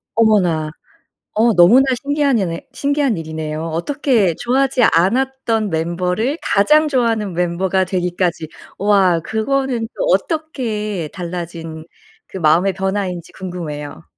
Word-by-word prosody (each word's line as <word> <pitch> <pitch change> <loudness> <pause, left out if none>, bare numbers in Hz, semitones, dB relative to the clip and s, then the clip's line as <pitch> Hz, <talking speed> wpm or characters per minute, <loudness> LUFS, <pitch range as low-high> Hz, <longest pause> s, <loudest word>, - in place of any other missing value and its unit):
어머나. 185 -9 +2 0.7
어 230 +2 +4
너무나 210 +10 +6 0.2
신기한 285 -3 +1
예네 170 -4 -3
신기한 280 -6 0
일이네요. 160 -1 -5
어떻게 200 - 0
좋아하지 260 +1 +1
않았던 225 +3 +1
멤버를 180 - -1
가장 300 +10 +3
좋아하는 230 -7 0
멤버가 180 +2 0
되기까지, 180 -2 -1 0.3
와 195 -4 +3
그거는 235 - -1
또 - - -1
어떻게 220 - -2
달라진 170 -3 -6 0.4
그 190 - -8
마음의 175 +4 +3
변화인지 190 -2 -3
궁금해요. 150 - -7
190 Hz, 290 characters per minute, -18 LUFS, 170-245 Hz, 0.7 s, 너무나